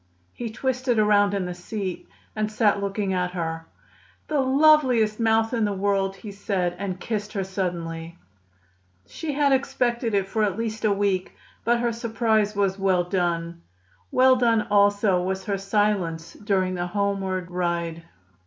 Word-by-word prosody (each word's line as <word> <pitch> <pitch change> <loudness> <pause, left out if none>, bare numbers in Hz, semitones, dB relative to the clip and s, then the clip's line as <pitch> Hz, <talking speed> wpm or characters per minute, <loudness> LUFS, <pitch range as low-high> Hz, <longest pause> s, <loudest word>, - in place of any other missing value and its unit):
He 240 -2 -5
twisted 255 +1 -1
himself 215 -1 +3
around 205 -1 +4
in 195 -2 -1
the 180 - -4
seat 185 +1 -5 0.3
and 215 0 -1
sat 210 -2 +2
looking 200 -1 -2
at 180 -1 -1
her. 165 -2 -4 0.6
"The 300 -2 +1
loveliest 260 -5 +4
mouth 225 +1 +2
in 230 -2 +1
the 205 -1 0
world!" 195 0 0
he 205 +2 -9
said, 195 -3 -2
and 190 -2 -4
kissed 210 -1 -4
her 195 -3 -1
suddenly. 170 -3 -4 0.9
She 315 -3 -5
had 285 0 +2
expected 245 -4 0
it 195 -1 +1
for 220 +3 -1
at 200 -2 0
least 220 -1 -3
a 210 - +3
week, 195 -2 0 0.3
but 235 +1 +2
her 240 -1 +1
surprise 220 -2 0
was 200 -1 0
well 190 -2 +2
done. 170 -2 -2 0.5
Well 260 0 +5
done 230 -3 +3
also 205 -2 +3
was 190 +1 -3
her 200 -2 -1
silence 195 -5 0
during 190 -3 -1
the 175 -1 -2
homeward 190 -2 -2
ride. 170 -2 -2
200 Hz, 160 wpm, -24 LUFS, 185-225 Hz, 0.9 s, Well